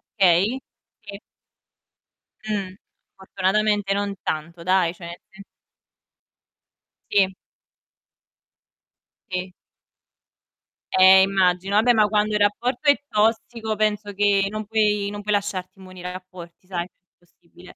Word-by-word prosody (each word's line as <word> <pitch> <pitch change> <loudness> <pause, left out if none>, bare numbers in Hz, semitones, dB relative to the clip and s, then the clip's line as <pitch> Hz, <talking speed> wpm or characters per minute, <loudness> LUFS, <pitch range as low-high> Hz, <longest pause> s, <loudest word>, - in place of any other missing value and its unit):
Okay. 195 +5 +3 0.4
Sì. 200 -2 -10 1.3
Mh, 200 -3 -3 0.4
fortunatamente 195 +1 0
non 200 0 -2
tanto 170 +2 -5
dai, 185 -2 +2
cioè 175 -1 -11
nel 170 +1 -8
sen 195 0 -14 1.7
Sì. 190 -2 +2 2.0
Sì. 185 0 -4 1.5
Eh, 190 0 +8
immagino. 190 0 +1
Vabbè, 235 +4 +4
ma 215 -2 +4
quando 210 0 0
il 210 - +1
rapporto 240 +7 +1
è 285 - +4
tossico 220 +1 0
penso 210 -1 -1
che 200 0 +2
non 215 +1 -5
puoi 210 -2 +1
non 205 0 -6
puoi 210 +1 -1
lasciarti 195 -2 -4
immuni 185 -1 -12
dai 180 0 -6
rapporti, 180 -1 -12
sai, 175 -2 -4 0.3
impossibile. 175 0 -19
200 Hz, 110 wpm, -22 LUFS, 185-210 Hz, 2.0 s, Eh